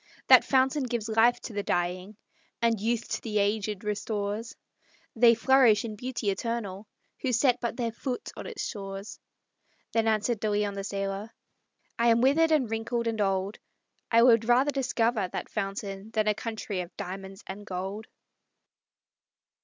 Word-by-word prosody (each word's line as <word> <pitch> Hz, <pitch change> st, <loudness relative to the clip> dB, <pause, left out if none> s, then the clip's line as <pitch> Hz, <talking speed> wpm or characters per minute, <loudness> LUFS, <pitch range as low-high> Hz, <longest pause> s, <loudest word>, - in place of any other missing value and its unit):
That -, -, +9 dB
fountain 265 Hz, +2 st, +2 dB
gives 235 Hz, -3 st, -2 dB
life 225 Hz, +2 st, +4 dB
to 230 Hz, -, -7 dB
the 205 Hz, -, -1 dB
dying, 180 Hz, +2 st, -2 dB, 0.4 s
And 230 Hz, -3 st, +1 dB
youth 230 Hz, +1 st, 0 dB
to -, -, -2 dB
the 215 Hz, -2 st, -2 dB
aged 205 Hz, 0 st, 0 dB
restores; 210 Hz, +1 st, -3 dB, 0.6 s
They 235 Hz, 0 st, +6 dB
flourish 235 Hz, -3 st, +4 dB
in 215 Hz, -2 st, -5 dB
beauty 235 Hz, -2 st, -2 dB
eternal, 210 Hz, -2 st, -4 dB, 0.3 s
Who 260 Hz, -, 0 dB
set 245 Hz, +1 st, +3 dB
but 235 Hz, -1 st, -3 dB
their 235 Hz, -2 st, -1 dB
foot 250 Hz, +2 st, -5 dB
on -, -, -7 dB
its -, -, -4 dB
shores!" 195 Hz, -1 st, -6 dB, 0.7 s
Then 225 Hz, -1 st, +1 dB
answered 220 Hz, +1 st, +1 dB
De 215 Hz, -, -1 dB
Leon, 205 Hz, -1 st, 0 dB
the 195 Hz, 0 st, -5 dB
sailor: 195 Hz, +1 st, -3 dB, 0.7 s
"I 235 Hz, -, +3 dB
am 230 Hz, 0 st, +5 dB
withered, 300 Hz, +6 st, +4 dB
and 295 Hz, -6 st, +3 dB
wrinkled, 225 Hz, +2 st, -2 dB
and 225 Hz, -2 st, -1 dB
old; 195 Hz, +1 st, -1 dB, 0.5 s
I 230 Hz, 0 st, +5 dB
would 230 Hz, -2 st, +5 dB
rather 250 Hz, +5 st, +4 dB
discover 240 Hz, -6 st, 0 dB
that -, -, -5 dB
fountain 195 Hz, 0 st, -4 dB
Than 215 Hz, -1 st, +1 dB
a 210 Hz, -, +4 dB
country 215 Hz, -3 st, -4 dB
of 175 Hz, 0 st, -10 dB
diamonds 195 Hz, 0 st, -7 dB
and 195 Hz, +2 st, -7 dB
gold." 195 Hz, +2 st, -5 dB
220 Hz, 160 wpm, -28 LUFS, 200-235 Hz, 0.7 s, That